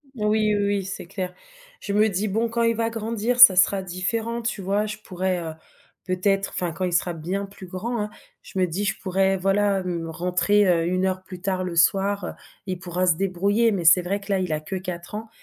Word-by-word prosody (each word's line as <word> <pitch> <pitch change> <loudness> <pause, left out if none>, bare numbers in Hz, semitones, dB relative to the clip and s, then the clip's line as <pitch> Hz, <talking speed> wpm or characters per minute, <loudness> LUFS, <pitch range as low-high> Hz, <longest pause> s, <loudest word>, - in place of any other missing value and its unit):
Oui 210 - -3
oui 215 0 +2
oui, 200 -1 0
c'est 190 -2 -6
clair. 185 0 -5 0.5
Je 200 - -4
me 215 +1 +4
dis: 200 +3 -1
«Bon 225 +4 0
quand 235 +1 0
il 230 0 +2
va 230 0 0
grandir 230 +2 -2
ça 195 -6 +11
sera 190 +1 +4
différent, 220 +6 -2
tu 225 -3 -3
vois». 200 +3 0
Je 210 0 -5
pourrais, 185 0 -2
heu, 160 -2 -5 0.5
peut-être 195 +2 0
enfin, 175 -2 -1
quand 185 +3 -3
il 180 - -2
sera 175 0 +1
bien 180 +5 -3
plus 195 -1 -12
grand, 225 +6 -4
hein. 210 - -3 0.3
Je - - -10
me 185 - +4
dis: 190 +5 -3
«Je 195 - -1
pourrais, 190 0 +1
voilà 195 +1 +2
m 175 -3 -3
rentrer, 180 +5 +2
heu, 170 -2 +3
1 185 +1 0
plus 185 -1 -10
tard 185 -1 -1
le 180 -2 -4
soir, 195 +4 +2
heu. - - -4 0.4
Il 185 -1 -3
pourra 180 0 -2
se 170 - +4
débrouiller». 200 +5 +1
Mais 185 -4 -2
c'est 170 +3 +7
vrai 190 +3 -2
que 200 0 -7
là, 195 - +2
il 180 -4 -1
a 150 - -1
que 175 +5 -5
4 180 +1 -6
ans 220 +1 -6
190 Hz, 230 wpm, -24 LUFS, 180-205 Hz, 0.5 s, ça